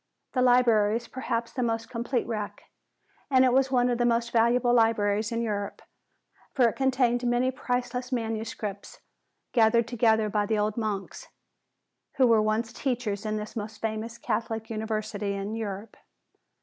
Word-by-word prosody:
The 255 - +1
Library 235 -4 +4
is 235 - -9
perhaps 235 -3 -3
the 255 - -2
most 225 -1 -1
complete 240 +1 -2
wreck, 215 -3 -5 0.7
and 260 -2 +5
it 250 - +3
was 265 0 +3
one 250 -2 +3
of 245 -1 0
the - - +3
most 235 0 +1
valuable 240 +1 +3
libraries 220 -2 +2
in 230 0 -1
Europe. 205 -3 -3 0.7
For 255 -4 +5
it 230 - -2
contained 255 -2 +1
many 245 +1 +2
priceless 250 0 -3
manuscripts 220 -3 -4 0.5
gathered 230 -1 +4
together 220 -2 +2
by 210 0 0
the 220 - +1
old 210 0 0
monks, 215 - -4 0.9
who 270 -4 +4
were 225 -3 +5
once 220 +2 0
teachers 235 -6 -2
in 215 0 -1
this 210 +2 -6
most 215 -1 -6
famous 225 +1 -4
Catholic 225 -1 -3
university 215 -2 -3
in 200 +2 -4
Europe. 210 -1 -5
230 Hz, 155 wpm, -27 LUFS, 215-245 Hz, 0.9 s, and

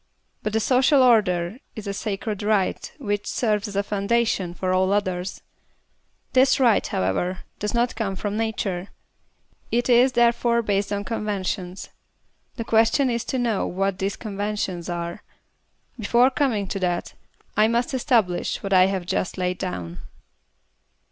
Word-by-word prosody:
But 215 - -3
the 220 - +2
social 260 +4 +4
order 205 -4 +3 0.2
is 215 -2 -7
a 200 - -3
sacred 205 0 -3
right 205 -2 0
which 205 -6 -2
serves 210 -4 0
as 200 - -8
a 200 - +1
foundation 200 -3 0
for 185 0 -1
all 185 +1 +2
others. 185 -2 -2 0.9
This 260 +2 +4
right, 235 -5 +4
however, 135 - -1 0.2
does 210 +2 -2
not 240 +1 +1
come 210 -4 -2
from 205 +2 -3
nature. 210 -5 -2 0.8
It 240 +2 +1
is 250 +2 +5
there 240 -1 +5
fore 235 0 0
based 200 -1 0
on 200 0 -1
conventions. 195 -4 -3 0.7
The 235 - -4
question 230 +4 +3
is 235 -1 -1
to 260 - -2
know 235 -5 0
what 195 0 -1
these 195 +1 -1
conventions 205 -4 -3
are. 170 +3 -4 0.8
Before 240 +4 +4
coming 250 -8 0
to 195 - -3
that, 175 -2 -1 0.4
I 215 +1 +5
must 235 +3 0
establish 230 -9 +1
what 195 -1 -1
I 185 0 +6
have 190 -2 -2
just 185 0 -2
laid 180 0 -1
down. 90 - -5
205 Hz, 150 wpm, -24 LUFS, 185-235 Hz, 0.9 s, I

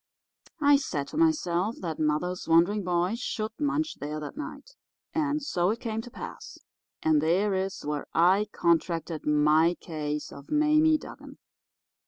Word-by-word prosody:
I 285 -1 +6
said 150 - -3
to - - -7
myself 230 - +1
that 165 -4 -4
mother's 155 +4 -1
wandering 175 +6 +4
boy 180 +2 0
should 220 -3 -3
munch 300 +1 -1
there 150 +1 -4
that 150 - -7
night. 300 - -8 0.4
And 300 -1 0
so 180 -9 0
it 225 +2 -1
came 225 -2 -3
to 245 - -11
pass. - - -9 0.5
And 155 -2 +3
there 185 +6 +2
is 190 0 -3
where 150 -1 -3
I 185 +5 +4
contracted 165 -1 0
my 150 +3 +4
case 150 -2 -4
of 140 0 -12
Mame 305 +1 +4
Dugan. - - -11
180 Hz, 150 wpm, -27 LUFS, -, 0.5 s, I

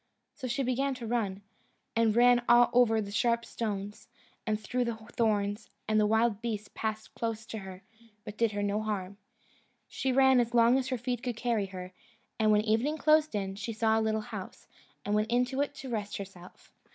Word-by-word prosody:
So 260 - -6
she 270 +3 -1
began 265 +2 0
to 245 - -7
run, 210 -4 -2 0.5
and 225 -1 +3
ran 245 0 +6
over 240 -1 +5
the 200 -1 -6
sharp 235 +2 +1
stones, 205 -2 -5 0.4
and 215 -1 0
through 245 +4 -1
the 235 -1 -2
thorns; 215 -2 -1 0.2
and 215 0 +3
the 210 - +3
wild 220 -1 +2
beasts 215 -3 -4
passed 220 0 -4
close 225 -1 -3
to 220 - -6
her, 190 -1 -10 0.4
but 210 - -8
did 225 -1 +1
her 205 0 -2
no 205 +1 0
harm. 200 -3 -4 0.7
She 265 - -2
ran 265 0 +5
as 235 0 0
long 235 +2 +5
as 260 - -3
her 260 -1 -1
feet 245 0 -3
could 245 -4 -3
carry 230 -5 0
her, 185 -1 -8 0.5
and 215 -1 +4
when 210 0 +4
evening 235 +8 +1
closed 310 -2 +3
in, 195 -2 -2
she 205 +3 -5
saw 220 0 +2
a - - 0
little 220 0 0
house, - - -8 0.4
and 205 - -1
went 215 +1 +1
into 250 +3 +1
it 285 0 -2
to 270 -1 -8
rest 210 -3 -3
herself. 190 -2 -11
225 Hz, 195 wpm, -30 LUFS, 210-245 Hz, 0.7 s, ran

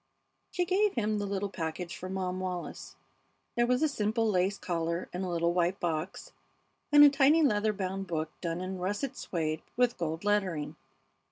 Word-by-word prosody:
She 360 -1 0
gave 395 +3 +2
him 215 -2 0
the 205 - -2
little 200 0 -1
package 170 0 -4
for 185 - -7
Mom 185 -1 -2
Wallis. 180 -2 -5 0.6
There 240 0 +3
was 250 +4 +2
a - - +5
simple 225 -4 0
lace 195 0 +1
collar 170 -1 -2
in 180 - -3
a 185 - -2
little 170 0 +1
white 180 +1 +1
box, 165 0 -3 0.6
and 295 0 +9
a 290 - +10
tiny 290 +3 +5
leather 215 -5 +3
bound 195 -1 -4
book 155 -2 -2
done 170 0 -2
in 185 0 -4
russet 205 +9 -2
suède 160 -9 -3 0.2
with 245 -3 +2
gold 160 0 -2
lettering. 195 -7 0
190 Hz, 175 wpm, -30 LUFS, 175-220 Hz, 0.6 s, a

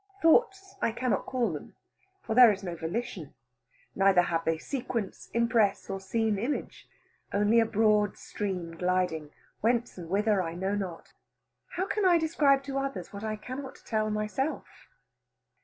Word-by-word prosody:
Thoughts 390 +2 +3
I - - +2
cannot 250 +2 -1
call 250 -3 0
them, - - -8 0.5
for - - -2
there 245 -1 +9
is 195 -1 -5
no 175 -2 -4
volition, 170 +9 -5 0.6
neither 195 -2 +4
have 165 -1 -1
they 165 0 +1
sequence, 235 - -4
impress, 230 -4 +1
or 195 - -3
seen 210 +2 0
image: 255 +8 -4 0.4
only 210 +3 +3
a 225 - +3
broad 210 -2 +2
stream 180 -5 -4
gliding, 180 -3 0 0.3
whence 235 -2 0
and 165 -2 -8
whither 205 +1 +2
I 165 -1 -4
know 190 +3 -1
not. 190 -5 -5 0.6
How 370 +1 0
can 420 +1 -1
I 360 -2 +6
describe 295 -4 +3
to 275 0 -3
others 270 -11 -4
what 200 +1 -7
I 215 0 -2
cannot 255 +5 -8
tell 215 -1 0
myself? 215 +8 -3
215 Hz, 155 wpm, -29 LUFS, 190-255 Hz, 0.6 s, there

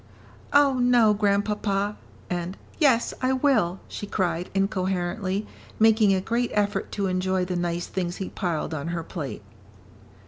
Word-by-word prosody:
"Oh, 280 -2 +4
no, 245 -3 +5
Grandpapa," 205 0 0 0.3
and 175 +1 -3 0.2
"yes, 265 -7 +3
I 255 0 +2
will," 240 -10 +2
she 205 - -6
cried, 180 -3 -1
incoherently, 190 0 -1 0.3
making 220 -2 +5
a 190 - +3
great 235 +5 -1
effort 205 0 0
to 200 - -1
enjoy 185 0 0
the 180 0 -3
nice 175 0 -1
things 180 -2 -3
he 190 - -5
piled 170 -4 -2
on 150 0 -4
her 170 -1 -3
plate. 150 - -6
195 Hz, 140 wpm, -25 LUFS, 180-220 Hz, 0.3 s, no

